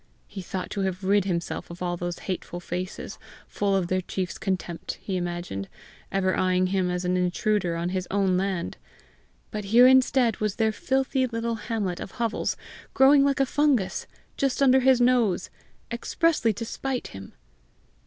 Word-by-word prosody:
He 195 - -8
thought 185 +1 -5
to 200 - -2
have 190 0 -2
rid 200 0 +3
himself 170 -3 -3
of 170 +1 -7
all 175 0 -1
those 175 0 -4
hateful 180 -1 -4
faces, 180 +2 -5 0.3
full 200 -1 0
of 190 -2 +1
their 185 +2 0
chiefs 185 0 -4
contempt, 180 -4 -3
he 195 - -4
imagined, 175 - -4 0.4
ever 185 -1 +1
eyeing 185 0 +2
him 185 -2 +1
as 180 0 -2
an 180 +1 +1
intruder 180 0 0
on 170 +1 -2
his 185 0 -2
own 195 -2 +2
land; 185 -2 -2 0.7
but 210 -1 -4
here 235 +5 +6
instead 260 -2 +4
was 210 -2 -1
their 220 -1 +2
filthy 265 +3 0
little 230 0 -2
hamlet 210 -5 -3
of - - -7
hovels 230 -2 -1 0.4
growing 275 +1 +6
like 280 -1 +1
a 270 - +4
fungus 275 -8 +1 0.3
just 275 -2 0
under 265 -1 +5
his 260 -1 +4
nose, 240 -7 +2 0.4
expressly 240 +1 +1
to 230 +3 -5
spite 260 +2 -3
him! 95 0 -10
195 Hz, 165 wpm, -26 LUFS, 180-240 Hz, 0.7 s, here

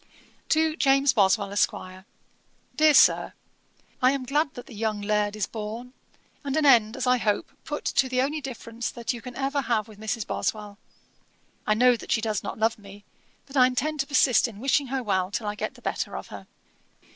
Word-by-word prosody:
'TO 315 0 +2
JAMES 275 0 +3
BOSWELL, 200 -2 +2
ESQ. 185 -1 -2 0.7
'DEAR 310 -1 +5
SIR, - - +5 0.7
'I 255 +1 +5
am 275 -2 -3
glad 295 +2 +1
that 245 - -8
the - - -13
young 215 -1 -2
Laird 210 0 0
is 215 - -1
born, 225 +3 -7 0.5
and 280 +1 -2
an 310 - +2
end, 235 -3 +5
as 260 - -2
I 250 0 +4
hope, 215 - -1
put - - -5
to 265 - +1
the 255 0 0
only 295 +4 0
difference 235 -3 -5
that 235 +1 -4
you 235 - -8
can 250 0 -9
ever 275 +1 -1
have 230 -4 -1
with 215 -2 -15
Mrs. 220 0 -3
Boswell. 210 -1 -4 0.9
I 215 - +3
know 250 +2 +5
that - - -8
she - - +3
does 215 -2 -2
not - - -6
love 220 0 0
me; 200 0 -13 0.4
but 275 0 -13
I 255 -2 +6
intend 295 +5 -2
to 275 - -1
persist 255 -4 +3
in 215 -3 -11
wishing 275 +2 +1
her 265 0 -2
well 190 -4 0
till 210 +2 -4
I 205 - -2
get 210 - -5
the - - -18
better - - -3
of - - -9
her. - - -10
240 Hz, 205 wpm, -26 LUFS, 210-270 Hz, 0.9 s, I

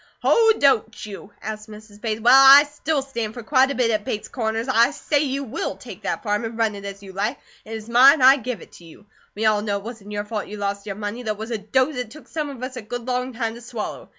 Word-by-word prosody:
"Oh, 450 -1 +5
don't 225 -7 +2
you?" 205 0 -10
asked 215 +1 -6
Mrs. 210 -1 -13
Bates. 220 -1 -2
"Well, 240 +3 +6
I 270 +1 +10
still 295 0 -2
stand 230 -5 -5
for 240 - -7
quite 265 +3 +3
a 280 - -3
bit 240 -2 +2
at 215 -1 0
Bates 210 0 -4
Corners, 225 -1 -2
and 260 - -1
I 235 +3 +6
say 295 0 -1
you 280 -1 -1
WILL 255 -1 -4
take - - -11
that - - -3
farm, 210 0 -1
and 225 0 -5
run 225 -2 +1
it 200 0 -9
as 200 0 -8
you 190 -1 -11
like. 210 +7 -2 0.3
It 225 - -8
is 220 -1 -7
mine, 260 +6 +7
I 265 +2 +7
give 250 -6 -5
it - - -18
to - - -16
you. 165 +4 -16 0.3
We 220 +2 -2
all 215 -1 +3
know 205 -1 -1
it 200 - -9
wasn't 215 -3 -9
your 205 0 -3
fault 210 -1 -4
you 210 - -8
lost 200 0 -3
your 200 - -4
money, 210 +3 -5
though 220 -3 -2
it - - -15
was 220 +3 -7
a 225 - -2
dose 260 +7 0
it 250 -3 -4
took 305 +7 -14
some 305 -2 -4
of 260 -3 -9
us 255 0 -5
a - - -5
good 235 +2 -6
long 250 0 -1
time 230 -1 -2
to 235 - -11
swallow. 235 -2 -6
225 Hz, 280 wpm, -22 LUFS, 210-260 Hz, 0.3 s, I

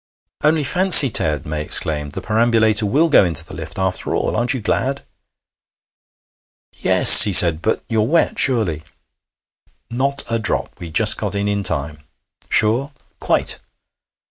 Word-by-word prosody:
'Only 155 0 0
fancy, 180 -3 +6
Ted!' 75 -8 -1
May 75 0 -6
exclaimed, 75 -1 -3
'the - - -8
perambulator 110 -1 -1
will 150 +10 0
go 150 - +2
into 80 -2 -3
the - - -15
lift, 80 -1 -10
after 95 -1 -4
all. - - -4
Aren't 120 +3 -1
you - - -6
glad?' 130 +5 -4 1.8
'Yes,' - - +7
he 105 - +5
said. 85 -3 +5
'But 110 - -4
you're 110 -2 -3
wet, 165 +5 -2
surely?' 110 - -1 1.1
'Not 140 +3 -4
a 115 0 -4
drop. 110 -4 -5
We 85 - -10
just 105 +6 +2
got 105 -2 -6
in 100 0 -4
in 100 0 -3
time.' 75 -5 -4 0.5
'Sure?' 120 +7 0 0.3
'Quite.' - - -2
105 Hz, 145 wpm, -16 LUFS, 85-125 Hz, 1.8 s, Yes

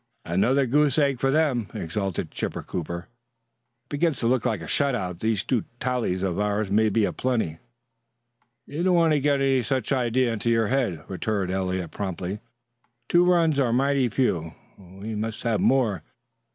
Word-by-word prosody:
"Another 125 +11 +2
goose 145 +2 +2
egg 140 -4 +2
for 135 - +1
them," 135 -7 +1
exulted 95 +2 -3
Chipper - - -4
Cooper. 85 0 -5 0.8
"It - - -46
begins 150 -1 0
to 115 - +1
look 125 0 +2
like 110 -5 -1
a - - -6
shut 140 - +1
out. 90 -6 -4
These 110 -2 0
two 120 -2 0 0.2
tallies 120 -8 -1
of 95 -1 -1
ours 105 -1 0
may 110 +2 +3
be 105 +1 +2
a - - -2
plenty." 110 -11 -1 1.1
"You 150 +4 -5
don't 180 0 +3
want 165 -2 +4
to 150 - +3
get 140 0 +1
any 135 -1 +3
such 130 +1 -2
an 135 - +3
idea 120 0 +1
into 115 +1 -2
your 115 -2 +2
head," 120 - 0
returned 95 -1 -2
Eliot 95 -2 -2
promptly. 95 0 -4 0.7
"Two 175 0 +5
runs 170 -5 +3
are 125 -4 +2
mighty 135 +1 +2
few; 85 -10 -1 0.2
we 95 +4 -8
must 110 +1 -4
have 115 -3 +1
more. 115 - +2
115 Hz, 180 wpm, -25 LUFS, 95-135 Hz, 1.1 s, Two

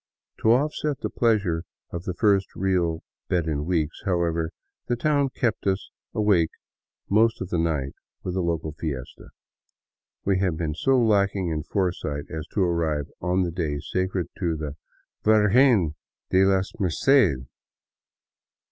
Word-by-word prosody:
To 110 - +4
offset 145 +2 +1
the - - -3
pleasure 100 -8 +1 0.3
of 85 +1 -5
the 90 - -3
first 100 -1 +2
real 90 -4 0 0.3
bed 85 -3 +1
in 75 -2 -2
weeks, 80 -3 -1
however, 85 -4 0 0.4
the 120 - +1
town 140 +2 +2
kept 120 -6 -1
us 95 0 -1 0.2
awake 100 -7 +3 0.6
most 110 +3 +3
of 95 - -5
the 85 - 0
night 75 -5 0 0.3
with 90 - -3
a 95 - +1
local 85 -2 -1
fiesta. 70 -5 -6 1.0
We 95 -1 +2
had 90 -5 0
been 80 -2 -2
so 135 - +2
lacking 100 -5 +2
in 80 -1 -1
foresight 85 -6 -2
as 80 0 -5
to 100 - -1
arrive 80 -5 0
on 90 +1 +1
the 85 - -2
day 80 -4 -2
sacred 95 +2 -2
to 85 -4 0
the 75 -2 -5 0.3
" - - -51
Virgen 110 - +4 0.4
de 95 +1 +5
la 95 -1 +3 0.2
Merced." 95 - +3
90 Hz, 145 wpm, -25 LUFS, 80-105 Hz, 1.0 s, de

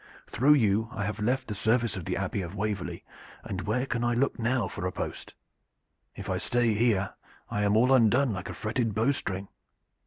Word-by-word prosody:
Through 145 +5 +4
you 110 -3 +2
I 105 - -3
have 105 +1 -3
left 125 +5 0
the 105 - -3
service 115 +2 +1
of 90 -3 -6
the - - -2
Abbey 100 - -2
of 90 +2 -6
Waverley, 105 -2 -3 0.4
and 100 -4 -4
where 125 +5 +1
can 120 -2 -2
I 120 0 +1
look 130 +1 0
now 120 -2 +1
for 90 - -4
a - - -2
post? - - -6 0.8
If - - -7
I - - -1
stay 120 -2 +1
here 105 -3 +1 0.4
I 105 - 0
am 105 +1 +3
all 125 +4 +5
undone 125 +1 +4
like 95 -1 -5
a - - -6
fretted 110 -1 -1
bow 115 +6 +3
string." 95 -7 -3
110 Hz, 205 wpm, -28 LUFS, 100-120 Hz, 0.8 s, all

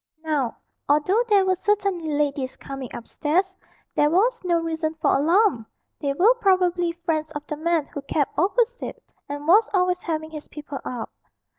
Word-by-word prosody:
Now, 290 -7 -1 0.3
although 305 +10 +3
there 400 -2 +5
were 375 - +3
certainly 380 -3 0
ladies 285 -3 -1
coming 270 -3 -7
upstairs, 345 +10 -1 0.4
there 295 - +3
was 420 +10 +2
no 345 -2 +2
reason 320 -1 -2
for 315 - +2
alarm; 320 - +3 0.3
they 285 -2 -1
were 390 - +5
probably 360 -3 +2
friends 310 -1 0
of 295 0 -6
the 300 - -4
man 325 0 0
who 285 - -7
kept 285 +1 -1
opposite, 475 +7 0 0.3
and 290 +1 -5
was 420 +6 +6
always 360 -1 +2
having 315 -1 -3
his 305 -1 -8
people 295 -2 -7
up. 240 -3 -5
320 Hz, 160 wpm, -24 LUFS, 295-370 Hz, 0.4 s, was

